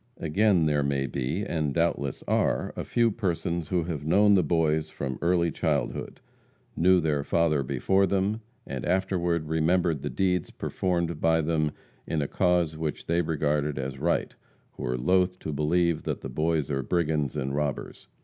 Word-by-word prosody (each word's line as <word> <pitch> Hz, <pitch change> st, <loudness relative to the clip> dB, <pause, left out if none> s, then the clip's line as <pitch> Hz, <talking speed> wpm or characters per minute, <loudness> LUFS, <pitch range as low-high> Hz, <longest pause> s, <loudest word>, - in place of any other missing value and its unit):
Again, 90 Hz, +1 st, +2 dB
there 75 Hz, -1 st, +2 dB
may 70 Hz, -1 st, 0 dB
be, 70 Hz, +9 st, -2 dB
and 75 Hz, -4 st, -2 dB
doubtless 80 Hz, -5 st, 0 dB
are, -, -, +1 dB
a -, -, -3 dB
few 115 Hz, -1 st, +2 dB
persons 85 Hz, -6 st, -2 dB
who 90 Hz, -2 st, 0 dB
have 80 Hz, -4 st, -4 dB
known 100 Hz, +6 st, +4 dB
the 95 Hz, -, +5 dB
Boys 80 Hz, -1 st, +1 dB
from 65 Hz, -4 st, -5 dB
early 85 Hz, -1 st, +2 dB
childhood -, -, -2 dB, 0.6 s
knew 90 Hz, +2 st, +4 dB
their 75 Hz, -4 st, 0 dB
father 80 Hz, -2 st, +2 dB
before 85 Hz, +9 st, +1 dB
them 100 Hz, +4 st, 0 dB, 0.2 s
and 65 Hz, -2 st, -5 dB
afterward 85 Hz, -3 st, 0 dB
remembered 80 Hz, -1 st, +1 dB
the -, -, -3 dB
deeds 90 Hz, -3 st, 0 dB
performed 85 Hz, -3 st, -2 dB
by 80 Hz, 0 st, +3 dB
them 75 Hz, -1 st, +1 dB, 0.4 s
in 80 Hz, -, -1 dB
a 70 Hz, -, -1 dB
cause 90 Hz, -3 st, +1 dB
which 80 Hz, -1 st, -4 dB
they 85 Hz, +1 st, +1 dB
regarded 75 Hz, -2 st, 0 dB
as 65 Hz, 0 st, -4 dB
right, -, -, 0 dB, 0.4 s
who -, -, -7 dB
are 60 Hz, 0 st, -1 dB
loth 90 Hz, +6 st, +2 dB
to 80 Hz, -, -5 dB
believe 85 Hz, +3 st, +1 dB
that -, -, -4 dB
the 65 Hz, -, -6 dB
Boys 75 Hz, +2 st, 0 dB
are 70 Hz, -1 st, 0 dB
brigands 75 Hz, -2 st, 0 dB
and 70 Hz, -2 st, -2 dB
robbers. 75 Hz, -1 st, -3 dB
80 Hz, 170 wpm, -27 LUFS, 75-90 Hz, 0.6 s, the